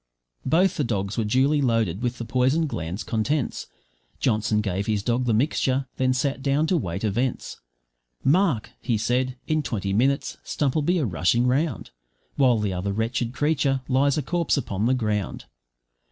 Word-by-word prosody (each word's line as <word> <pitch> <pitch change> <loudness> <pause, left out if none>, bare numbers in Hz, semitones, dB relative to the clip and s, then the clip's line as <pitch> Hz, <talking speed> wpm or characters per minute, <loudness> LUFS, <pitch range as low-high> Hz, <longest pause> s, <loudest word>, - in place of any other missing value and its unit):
Both 180 +7 +3
the 150 - +1
dogs 100 -4 -2
were 115 - 0
duly 135 +7 +2
loaded 115 -7 +1
with 125 0 -2
the 115 - -5
poison 130 +7 +2
gland's 90 - -4
contents; 115 +7 -1 0.5
Johnson 110 -2 +1
gave 100 -1 -2
his 105 -2 0
dog 120 +2 0
the 120 - +1
mixture, 135 +1 +1
then 130 0 +2
sat 135 +2 -1
down 140 +3 +1
to 175 +2 +2
wait 90 - -3
events. 120 +5 -1 0.7
`Mark,' 155 - +2
he 115 -3 0
said, 125 +3 0
`in 155 -1 +1
twenty 100 -6 -2
minutes 135 +6 +1
Stump'll 145 +1 0
be 175 +5 +1
a 155 - +1
rushing 105 +5 +1
round, 135 +2 0 0.4
While 130 -4 +4
the 105 -3 -1
other 90 +2 -2
wretched 115 +3 -1
creature 140 -1 +1
lies 135 +2 +2
a 150 - 0
corpse 170 +2 0
upon 105 -5 -1
the 130 - +3
ground.' 105 -5 -2
125 Hz, 170 wpm, -24 LUFS, 110-140 Hz, 0.7 s, While